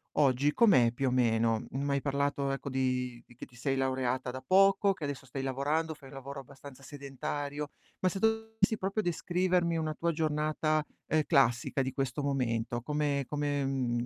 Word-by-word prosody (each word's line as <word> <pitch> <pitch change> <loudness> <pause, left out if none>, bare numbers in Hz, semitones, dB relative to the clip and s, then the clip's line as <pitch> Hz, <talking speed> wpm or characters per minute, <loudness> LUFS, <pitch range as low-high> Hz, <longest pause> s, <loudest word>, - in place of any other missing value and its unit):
oggi 140 0 +3
com'è 180 - +5
più 135 +2 -1
o - - -2
meno? 115 -2 +2
M'hai 140 +1 -1
parlato 140 0 0
ecco 135 +1 -4
di 125 -2 -1
di 120 - -18
che - - -8
ti 125 - -21
sei 135 +2 0
laureata 130 -1 0
da 130 +1 -7
poco, 195 +3 +5
che 185 -5 -10
adesso 140 -1 -5
stai 135 +1 -5
lavorando, 145 +5 0
fai 140 -2 -14
un 135 - -12
lavoro 135 +1 -7
abbastanza 140 0 -13
sedentario, 145 +1 -5 0.3
ma 185 - +1
se 195 - -4
dovessi 220 0 +1
proprio 195 +3 -1
descrivermi 175 0 +1
una 155 -1 -1
tua 170 +2 0
giornata, 155 0 +1 0.3
ehm, 155 0 +2
classica 135 -3 +3
di 130 0 -1
questo 135 +1 -2
momento, 120 -4 -1
come 145 +1 -1
come, 145 -1 -1
mhmm, 125 -3 -1
140 Hz, 175 wpm, -31 LUFS, 130-155 Hz, 0.3 s, com'è